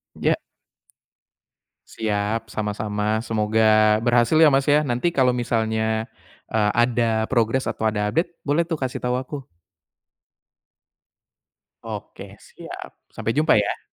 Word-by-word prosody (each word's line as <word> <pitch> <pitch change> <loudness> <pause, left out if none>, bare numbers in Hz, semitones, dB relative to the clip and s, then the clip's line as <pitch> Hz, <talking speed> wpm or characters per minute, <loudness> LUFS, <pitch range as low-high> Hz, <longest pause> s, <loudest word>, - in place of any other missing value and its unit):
Ya. - - +1 1.5
Siap, 110 +1 -2
sama-sama, 105 +1 -2
semoga 110 0 +3
berhasil 120 +5 +3
ya 155 -2 +6
Mas 135 +2 +2
ya. 150 +1 +4
Nanti 125 +5 0
kalau 130 -6 +2
misalnya, 110 -2 -1 0.5
eee 105 -2 +2
ada 115 -2 0
progres 120 +1 +1
atau 110 - -1
ada 105 -1 -1
update, 165 +2 +1 0.2
boleh 145 +3 +1
tuh 165 - -1
kasih 130 -4 -4
tahu 125 0 -1
aku. 130 +3 -5 2.4
Oke - - -8
siap, - - -10 0.2
sampai - - -3
jumpa 155 +1 +4
ya. 105 -1 +1
115 Hz, 115 wpm, -22 LUFS, 110-130 Hz, 2.4 s, ya